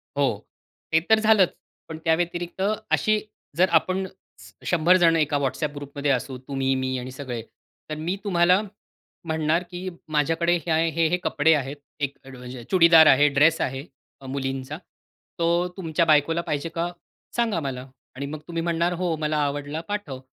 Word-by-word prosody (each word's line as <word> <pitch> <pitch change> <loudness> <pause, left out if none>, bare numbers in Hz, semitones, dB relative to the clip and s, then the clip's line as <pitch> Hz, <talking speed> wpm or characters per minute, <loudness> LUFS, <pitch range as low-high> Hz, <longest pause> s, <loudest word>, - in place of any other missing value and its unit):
हो, 130 -7 0 0.4
ते 160 - +5
तर 220 0 +6
झालंच. 215 -4 +5 0.4
पण 160 - -6
त्याव्यतिरिक्त 175 +2 -1 0.3
अशी 215 0 +3 0.4
जर 185 +2 +4
आपण 185 +3 -1 0.6
100 175 +1 +4
जण 165 -1 +5
एका 150 -2 +1
WhatsApp 140 +2 -2
ग्रुपमध्ये 145 0 -2
असू, 130 0 -2
तुम्ही, 135 -1 0
मी 130 0 -1
आणि 130 +1 -7
सगळे. 130 -3 -5 0.5
तर 155 - -3
मी 165 +5 -2
तुम्हाला 180 0 +3 0.6
म्हणणार, 160 +1 0
की 180 +1 -5 0.3
माझ्याकडे 165 +4 +2
हे, - - 0 0.2
हे, 165 +1 +1
हे 175 +3 +1
कपडे 160 +2 +3
आहेत. 140 -1 -2 0.2
एक 140 -1 -3 0.5
चुडीदार 165 -3 +7
आहे, 145 +2 +6
ड्रेस 165 +2 +4
आहे 135 +3 -3 0.4
अ, - - -12
मुलींचा. 135 +1 -4 0.6
तो 170 +1 +2
तुमच्या 165 -2 0
बायकोला 160 +2 +3
पाहिजे 150 0 -3
का, 170 +1 -1 0.4
सांगा 230 -7 +1
मला. 135 -3 -5 0.3
आणि 140 +2 -4
मग 150 +2 -6
तुम्ही 165 -1 -3
म्हणणार, 170 +1 0
हो 175 -1 -1
मला 150 0 0
आवडला, 145 +2 -3
पाठव. 205 -11 -4
160 Hz, 155 wpm, -24 LUFS, 140-175 Hz, 0.6 s, चुडीदार